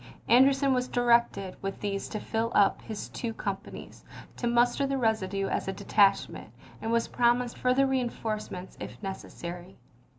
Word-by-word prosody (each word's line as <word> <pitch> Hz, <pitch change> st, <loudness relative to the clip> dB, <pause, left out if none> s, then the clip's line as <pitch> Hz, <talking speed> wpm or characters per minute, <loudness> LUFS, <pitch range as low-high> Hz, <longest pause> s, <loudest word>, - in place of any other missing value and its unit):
An 245 Hz, +3 st, +7 dB
derson 275 Hz, 0 st, +2 dB
was 250 Hz, 0 st, 0 dB
directed 235 Hz, -6 st, +2 dB
with 195 Hz, 0 st, -4 dB
these 200 Hz, -1 st, -3 dB
to 215 Hz, -, -4 dB
fill 225 Hz, +2 st, -2 dB
up 200 Hz, -, +4 dB
his 215 Hz, -2 st, -6 dB
two 225 Hz, -2 st, -4 dB
companies, 200 Hz, -3 st, -6 dB, 0.3 s
to 240 Hz, -, -2 dB
muster 240 Hz, +3 st, +2 dB
the 275 Hz, 0 st, -1 dB
residue 200 Hz, -5 st, 0 dB
as -, -, -2 dB
a 195 Hz, -, -1 dB
detachment, 200 Hz, +1 st, +2 dB, 0.3 s
and 225 Hz, -, -2 dB
was 230 Hz, 0 st, +2 dB
promised 240 Hz, 0 st, +1 dB
further 255 Hz, +2 st, +2 dB
reinforcements, 220 Hz, -7 st, -3 dB
if 105 Hz, +3 st, -7 dB
nec 195 Hz, -1 st, -3 dB
essary. 175 Hz, +2 st, -9 dB
225 Hz, 160 wpm, -28 LUFS, 195-245 Hz, 0.3 s, An